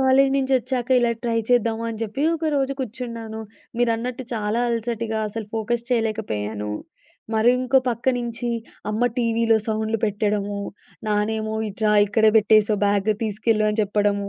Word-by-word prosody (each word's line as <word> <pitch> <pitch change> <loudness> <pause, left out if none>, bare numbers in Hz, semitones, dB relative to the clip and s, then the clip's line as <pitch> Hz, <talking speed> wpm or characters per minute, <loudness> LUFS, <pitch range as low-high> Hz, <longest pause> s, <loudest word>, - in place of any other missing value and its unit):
College 265 +1 +4
నుంచొచ్చాక 260 -2 0
ఇలా 240 -1 +2
try 230 -1 +1
చేద్దాము 230 -2 +2
అని 220 - -7
చెప్పి 240 +7 -4
ఒకరోజు 285 -4 0
కూర్చున్నాను. 230 -2 -5 0.4
మీరన్నట్టు 245 +2 0
చాలా 215 +2 -1
అలసటిగా 230 -1 -2
అసలు 220 -1 -5
ఫోకస్ 235 +2 -1
చేయలేకపోయాను. 110 - -1 0.6
మరి 220 +2 +4
ఇంకో 265 +1 +4
పక్కనుంచి 240 0 -1 0.4
అమ్మ 220 +3 -1
టీవీలో 230 -1 +2
సౌండ్‌లు 220 0 -1
పెట్టడము, 205 -1 -1 0.5
నానేమో, 215 +1 0
"ఇటు 205 +2 -7
రా 210 - +4
ఇక్కడే 215 +2 +3
పెట్టేసేవు 215 0 +4
బ్యాగ్ 200 +1 +2
తీసుకెళ్లు" 215 0 +1
అని 210 - -4
చెప్పడము. 205 -1 0
225 Hz, 130 wpm, -23 LUFS, 210-240 Hz, 0.6 s, College